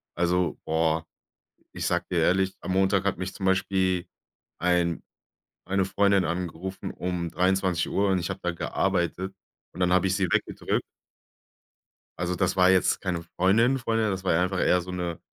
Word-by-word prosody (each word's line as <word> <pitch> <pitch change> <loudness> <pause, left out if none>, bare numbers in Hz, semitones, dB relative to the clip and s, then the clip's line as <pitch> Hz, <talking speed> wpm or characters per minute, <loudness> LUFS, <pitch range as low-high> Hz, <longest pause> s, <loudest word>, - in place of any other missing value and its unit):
Also, 90 +1 +1
boah, 80 0 +1 0.7
ich - - -3
sage - - 0
dir - - +1
ehrlich, 95 +1 +2
am 95 - -3
Montag 95 0 +2
hat 100 -3 0
mich 95 +1 -4
zum 95 - -4
Beispiel 95 -1 +1 0.5
ein 85 -1 +1 0.6
eine 95 0 +1
Freundin 100 -1 +2
angerufen 90 +2 -4
um 90 -2 -3
23:00, 95 +1 +1
und 95 -1 +2
ich 85 - -3
habe - - -5
da 90 - 0
gearbeitet, 95 +2 -1 0.4
und 90 - -10
dann 90 0 +2
habe 95 +1 +3
ich 95 - +1
sie 95 - +1
weggedrückt. - - -1 1.4
Also, 90 +1 -1
das 95 -1 0
war 90 0 +5
jetzt 95 -1 +3
keine 90 -3 -2
Freundin 110 +10 +2
Freundin, 115 -3 0
das 95 -1 -3
war 95 - +2
einfach 90 +1 0
eher 90 +1 +3
so 90 +1 -8
'ne 90 -2 -3
90 Hz, 165 wpm, -26 LUFS, 90-95 Hz, 1.4 s, war